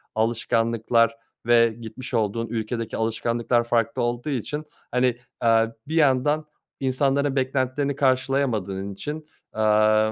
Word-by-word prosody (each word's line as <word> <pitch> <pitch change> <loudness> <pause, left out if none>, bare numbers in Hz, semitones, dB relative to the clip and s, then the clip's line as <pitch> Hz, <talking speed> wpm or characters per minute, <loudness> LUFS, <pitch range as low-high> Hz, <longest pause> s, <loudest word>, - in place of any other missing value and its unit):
alışkanlıklar 115 +1 +1 0.3
ve 115 0 +5
gitmiş 115 +3 -8
olduğun 115 0 0
ülkedeki 115 0 -3
alışkanlıklar 115 +1 0
farklı 115 -1 0
olduğu 120 +4 -1
için, 145 +3 -3 0.3
hani, 125 -1 +2 0.2
aaa, 115 -1 +4 0.2
bir 160 - -3
yandan 150 0 +3 0.3
insanların 135 +1 +1
beklentilerini 135 +1 0
karşılayamadığın 130 -8 0
için, 150 +9 -6 0.3
aaa, 110 0 +3
120 Hz, 105 wpm, -24 LUFS, 115-135 Hz, 0.3 s, ve